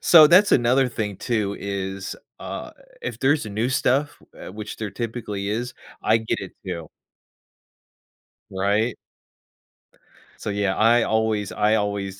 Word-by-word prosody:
so 160 -3 +8
that's 185 +6 +6
another 125 +2 +4
thing, 105 -5 -3
too, 105 -5 -1
is, 95 -1 -4 0.2
uh, - - -6 0.3
if - - -4
there's 145 -1 +2
a - - -6
new 110 +5 0
stuff, 135 +2 +1 0.2
uh, - - -9
which 105 +1 -7
there 110 -2 -4
typically 105 -4 -4
is, 120 +4 -2 0.3
I 110 - +4
get 110 - -2
it, 95 - -7
too. 85 -4 -5 1.6
Right? 100 +5 0 1.5
So, - - -3
yeah, 100 -1 0
I 115 +2 +4
always 110 -2 0
I 105 +1 +2
always 100 -2 -2
110 Hz, 140 wpm, -23 LUFS, 100-120 Hz, 1.6 s, so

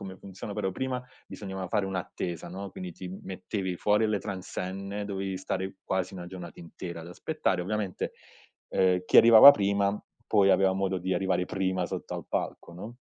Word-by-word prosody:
come 95 -1 -7
funziona, 100 +2 -8
però 95 -3 -1
prima 130 +4 -3 0.2
bisognava 95 -2 -6
fare 100 +1 0
un'attesa, 90 -3 -4
no, 95 +2 -6
quindi 90 -2 -7
ti 90 +2 -8
mettevi 95 0 -4
fuori 105 +3 +2
alle 105 -2 +1
transenne, 100 +1 -5
dovevi 95 -1 -3
stare 95 0 -3
quasi 95 0 -2
1 90 -2 -7
giornata 90 -2 -9
intera 85 0 -7
ad 80 - -10
aspettare. 95 - -1
Ovviamente, 100 -1 -3 0.6
uhm, 90 -1 +2
chi - - +4
arrivava 115 +4 +11
prima 100 -1 +1 0.3
poi 100 -2 +4
aveva 95 -1 +4
modo 95 -1 -1
di 95 +1 -1
arrivare 95 0 +1
prima 95 -1 -1
sotto - - -5
al - - -5
palco, - - -3
no. 105 +7 -9
95 Hz, 170 wpm, -28 LUFS, 90-100 Hz, 0.6 s, arrivava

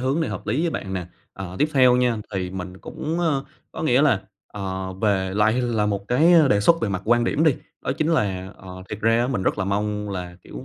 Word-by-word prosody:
hướng 135 +6 0
này 160 - -1
hợp - - -6
lý 120 +9 0
với 170 - +1
bạn 95 - -5
nè. 90 -2 -3 0.3
Ờ, 95 -1 -7
tiếp 150 - +2
theo 125 -2 +5
nha 125 -2 +2 0.2
thì 90 -1 -2
mình 90 0 -7
cũng, 160 - -4
ơ 150 -5 0 0.3
có - - -6
nghĩa 135 -2 +3
là, 125 -10 +3 0.2
ờ, 95 -2 -5
về 95 -1 0
lại 110 +4 +3
là 110 -4 0
một 100 0 -3
cái 155 +8 +4 0.2
đề 100 - +4
xuất 165 +9 +4
về 115 - 0
mặt 95 -1 -3
quan 120 +1 +3
điểm 150 +6 +1
đi, 155 - +4 0.3
đó - - -1
chính 155 - +1
là, 95 -8 -1
ờ, 95 0 -10
thiệt 105 - -6
ra 115 +1 +3
á 120 - +1
mình 125 -7 -2
rất 105 - 0
là 95 - 0
mong 105 +1 -2
là, 90 -2 -6
kiểu 60 +2 -9
105 Hz, 250 wpm, -23 LUFS, 95-130 Hz, 0.3 s, theo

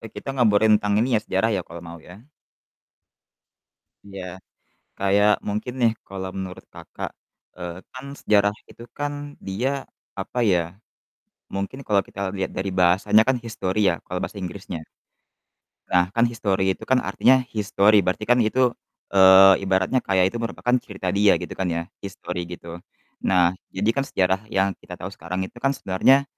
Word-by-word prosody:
e - - -15
nih - - -22
kita - - -7
ngobrolin 110 -3 +5
tentang 105 0 +1
ini 120 0 +2
ya - - +1
sejarah 95 +4 +1
ya, - - -1
kalau 85 +1 -10
mau 85 0 -9
ya. 90 +5 -14 1.9
Iya, 95 -2 -8 0.7
kayak 100 +1 +3 0.2
mungkin 105 +4 -3
nih 115 -1 +5 0.2
kalau 95 -1 -5
menurut 95 -1 -7
Kakak, - - -7 0.5
eee, 90 -1 -6 0.2
kan 130 +1 -9
sejarah 100 -1 +3 0.2
itu 115 - -13
kan 145 0 -2 0.3
dia 105 +8 -1 0.5
apa 95 +5 -4
ya, 90 - +4 1.0
mungkin 100 +6 -4
kalau 100 -2 +3
kita 100 - -9 0.2
lihat 95 - -2
dari 95 +1 -2
bahasanya 90 +4 +5
kan 130 - +3
history 110 -4 -3
ya - - +3
kalau 90 0 -4
bahasa 100 - -5
Inggrisnya. 90 -2 -6 1.1
Nah, 90 +1 +2
kan 115 +2 +3
history 95 -5 0
itu - - -10
kan 130 -1 +2
artinya 130 +1 +3
his 105 -2 -3
story 100 0 +5
berarti 95 +4 -1
kan 120 0 +5
itu, 125 +2 +2 0.4
eee, 95 0 +8
ibaratnya 95 +6 +1
kayak 95 -1 +3
itu 120 - -7
merupakan 120 +1 -1
cerita 100 -6 -5
dia 100 +2 +4
gitu - - -6
kan 95 - -1
ya 85 0 -1 0.2
his 100 - -5
story 90 0 -4
gitu. 85 0 -9 0.4
Nah, 90 -2 +4 0.2
jadi 100 +3 -1
kan 140 - +1
sejarah 95 -6 +1
yang 95 0 +2
kita 90 - -10
tahu 95 - -4
sekarang 90 0 -5
itu - - -19
kan 135 +2 +2
sebenarnya 130 +9 +3
100 Hz, 170 wpm, -23 LUFS, 95-110 Hz, 1.9 s, eee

